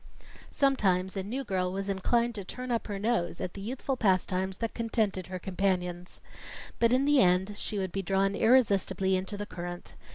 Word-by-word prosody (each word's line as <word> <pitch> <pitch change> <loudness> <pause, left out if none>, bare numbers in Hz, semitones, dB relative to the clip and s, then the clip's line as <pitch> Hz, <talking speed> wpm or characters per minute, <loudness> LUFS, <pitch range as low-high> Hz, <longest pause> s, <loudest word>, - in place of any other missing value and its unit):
Sometimes 190 -10 +1
a 195 - -1
new 240 +8 -4
girl 185 -5 -1
was 195 +1 -3
inclined 235 +5 +1
to 205 -3 -5
turn 250 +6 -5
up 230 - -1
her 205 -2 -3
nose 195 -5 0
at 180 - -4
the 200 - -8
youthful 255 +5 -3
pastimes 190 -3 +1
that 230 -1 -3
contented 220 -5 -1
her 185 0 -5
companions. 180 -1 -2 0.6
But 230 0 +4
in 260 +2 +3
the 290 -1 +4
end 185 -1 +3
she 210 +1 -3
would 190 -2 -2
be 195 - -2
drawn 195 +1 +1
irresistibly 195 -6 +3
into 190 +2 -3
the 205 - -4
current. 175 -2 -7
195 Hz, 185 wpm, -29 LUFS, 185-230 Hz, 0.6 s, But